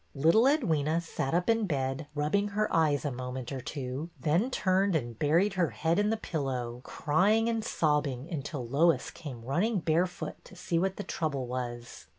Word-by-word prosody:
Little 165 - +5
Edwyna 165 - +2
sat 165 -3 -2
up 180 +1 +1
in 225 -2 +2
bed 135 -1 -2
rubbing 155 +8 +1
her 210 +1 0
eyes 155 -3 +2
a 145 - 0
moment 125 0 -5
or 135 -2 -4
two, 135 +4 -5
then 165 - +2
turned 190 -5 +2
and 120 -6 -2
buried 170 +7 +3
her 175 -4 +1
head 160 - 0
in 210 0 +2
the 225 - +1
pillow, 130 - -3
crying 205 +13 +2
and 225 -1 0
sobbing 150 - 0
until 145 -5 -4
Lois 155 +7 +2
came 135 -8 -8
running 195 - +1
barefoot 170 +1 -1
to - - -14
see 170 -1 -1
what 190 +2 0
the 205 - -4
trouble 145 -9 -2
was. 120 -1 -6
155 Hz, 175 wpm, -30 LUFS, 135-185 Hz, -, Little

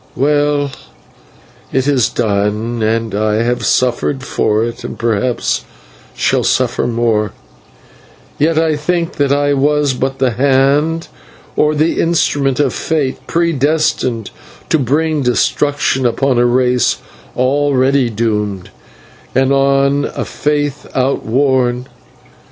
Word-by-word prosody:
Well, 145 0 +1 1.0
it 130 +1 0
is 135 -5 +2
done, 110 +2 -1
and 110 0 0
I 105 +1 0
have 120 +1 -1
suffered 130 +2 0
for 110 -4 0
it 120 0 -6
and - - -6
perhaps 115 +1 -1 0.5
shall - - +1
suffer - - +1
more, 115 -3 0 1.1
yet 155 +2 +2
I 160 -2 +2
think 170 +2 -2
that 140 -1 +1
I 145 0 +2
was 145 0 +2
but 135 +1 -2
the 130 -2 +1
hand 140 +6 +2 0.5
or 150 0 +2
the 155 +2 +1
instrument 145 -5 +1
of 145 - +1
Fate 150 -5 -1
predestined 150 - 0 0.4
to 160 - +2
bring 150 +4 0
destruction 135 +1 +1
upon 130 +1 +1
a 120 - +4
race 125 0 +2 0.4
already 135 -1 +2
doomed, 105 -4 -2 0.6
and 135 +1 +3
on 140 +1 +2
a - - -3
faith 145 -1 -2
outworn. 130 -1 +1
135 Hz, 115 wpm, -15 LUFS, 120-145 Hz, 1.1 s, a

